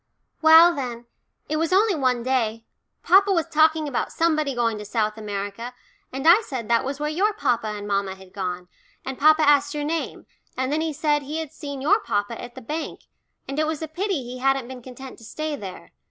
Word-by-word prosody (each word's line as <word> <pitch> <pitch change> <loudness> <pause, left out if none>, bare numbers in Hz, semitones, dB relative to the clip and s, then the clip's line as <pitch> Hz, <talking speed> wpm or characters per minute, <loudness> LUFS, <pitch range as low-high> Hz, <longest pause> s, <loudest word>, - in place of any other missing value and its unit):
"Well, 325 +2 +8
then, 245 -5 -5 0.4
it 310 - -1
was 325 +2 0
only 405 +2 +4
one 255 -6 0
day 230 -3 -1 0.4
papa 395 +2 +5
was 335 -4 +1
talking 315 0 +3
about 275 - -2
somebody 310 -4 +1
going 230 -3 0
to - - -6
South 215 0 -1
America, 210 +3 -5 0.4
and 270 +4 -3
I 360 +7 +8
said 260 - -6
that 235 0 +3
was 275 +2 -4
where 300 - -1
your 405 +7 +1
papa 235 - 0
and 205 -1 -5
mamma 200 -1 -1
had 190 -1 -16
gone, 180 -2 -4 0.4
and 265 -1 -5
papa 310 +1 +5
asked 290 0 +4
your 295 - -2
name, 320 +2 -3 0.3
and 260 +1 -1
then 310 - 0
he 320 0 -1
said 295 0 +1
he 290 +3 -5
had 320 -3 -4
seen 285 -4 -7
your 410 +9 +4
papa 205 - -2
at 240 0 -9
the 260 - -9
bank, 305 +7 -5 0.5
and 275 +2 -3
it 310 - +1
was 315 0 -3
a - - -3
pity 355 -2 -2
he 250 +1 -8
hadn't 270 -1 +1
been 255 -1 -9
content 255 +2 -11
to - - -15
stay 310 +7 -4
there. 190 -8 -9
270 Hz, 210 wpm, -24 LUFS, 230-315 Hz, 0.5 s, Well